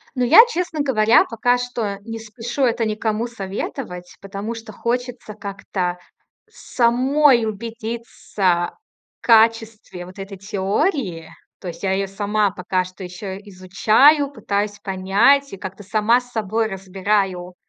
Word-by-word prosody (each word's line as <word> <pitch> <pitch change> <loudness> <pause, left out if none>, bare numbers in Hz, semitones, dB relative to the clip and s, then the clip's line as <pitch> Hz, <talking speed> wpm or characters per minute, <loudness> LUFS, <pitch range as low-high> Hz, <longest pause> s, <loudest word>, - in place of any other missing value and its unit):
Ну, 250 -1 +1
я, 345 - +9
честно 350 -8 -3
говоря, 225 -5 +4
пока 245 +2 +1
что 235 -5 -3
не 225 0 -6
спешу 230 +4 -4
это 235 -2 +1
никому 215 +1 -1
советовать, 195 -3 -6
потому 200 +3 -5
что 225 -1 -10
хочется 245 0 -3
как-то 195 -3 -4 0.5
самой 255 +1 +2
убедиться 220 -5 -2 0.4
в - - -24
качестве 225 -5 +2
вот 185 +2 -13
этой 195 0 -7
теории. 200 - -2 0.3
То 185 - -7
есть 170 +2 -8
я 190 - 0
её 195 +1 0
сама 205 +1 0
пока 185 -1 -1
что 185 +1 -11
ещё 190 +2 -7
изучаю, 215 +9 +3
пытаюсь 205 -4 -2
понять 200 +9 +2
и - - -7
как-то 190 +2 -8
сама 215 +4 +2
с 245 0 -17
собой 220 +1 -1
разбираю 190 -2 -2
215 Hz, 130 wpm, -21 LUFS, 195-235 Hz, 0.5 s, я